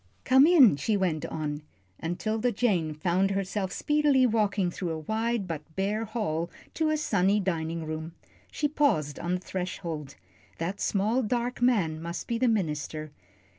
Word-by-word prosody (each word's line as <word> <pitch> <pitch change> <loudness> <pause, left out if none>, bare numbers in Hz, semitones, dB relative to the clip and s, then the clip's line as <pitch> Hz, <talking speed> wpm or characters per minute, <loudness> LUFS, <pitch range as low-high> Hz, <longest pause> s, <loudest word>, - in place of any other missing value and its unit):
"Come 265 +3 +6
in," 275 - +7
she 210 +8 0
went 170 -6 -1
on, 150 -1 -4 0.4
and 170 +2 -3
'Tilda 220 +3 0
Jane 185 -9 +1
found 180 +5 +1
herself 195 0 -2
speedily 295 +1 +3
walking 205 -5 +1
through 175 0 -4
a 160 - -2
wide 220 +5 -1
but 165 -4 -4
bare 210 +3 -1
hall 180 -7 -2 0.2
to 315 -1 +1
a 310 - +1
sunny 200 -7 +2
dining 165 -3 -2
room. 155 +1 -5 0.4
She 295 - 0
paused 210 - +1
on 175 +1 -1
the - - -2
threshold. 170 -6 -5 0.4
That 180 +5 -3
small, 215 +6 +1
dark 240 +2 -2
man 185 -11 +2
must 170 +1 -5
be 230 -1 -1
the 255 - +3
minister. 155 -7 -1
195 Hz, 160 wpm, -28 LUFS, 165-230 Hz, 0.4 s, in